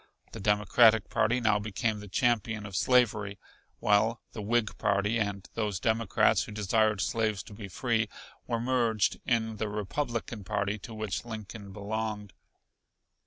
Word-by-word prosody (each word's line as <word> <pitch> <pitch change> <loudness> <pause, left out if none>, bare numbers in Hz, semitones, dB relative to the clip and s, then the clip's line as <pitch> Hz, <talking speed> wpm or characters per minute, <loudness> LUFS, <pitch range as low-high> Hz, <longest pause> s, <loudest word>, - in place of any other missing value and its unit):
The - - -8
Democratic 105 +2 +4
party 120 +4 +2
now 105 -3 +3
became 105 +1 -2
the 105 - -9
champion 110 0 0
of 100 -2 -7
slavery, 105 -3 +2 0.4
while 110 +2 +3
the 110 - -6
Whig 110 +1 0
party, 105 +4 +1
and 100 -2 -2
those 105 -4 -1
Democrats 110 -1 +2
who - - -9
desired 105 0 +1
slaves 110 -3 0
to - - -12
be 100 -1 -8
free, 115 +4 0 0.4
were 115 -1 -1
merged 115 -4 +1
in 110 -2 +1
the 110 0 -2
Republican 115 +1 -3
party 100 +3 -1
to 110 +3 -9
which 110 -3 -3
Lincoln 110 -3 -8
belonged. 105 0 -4
110 Hz, 145 wpm, -29 LUFS, 105-115 Hz, 0.4 s, Democratic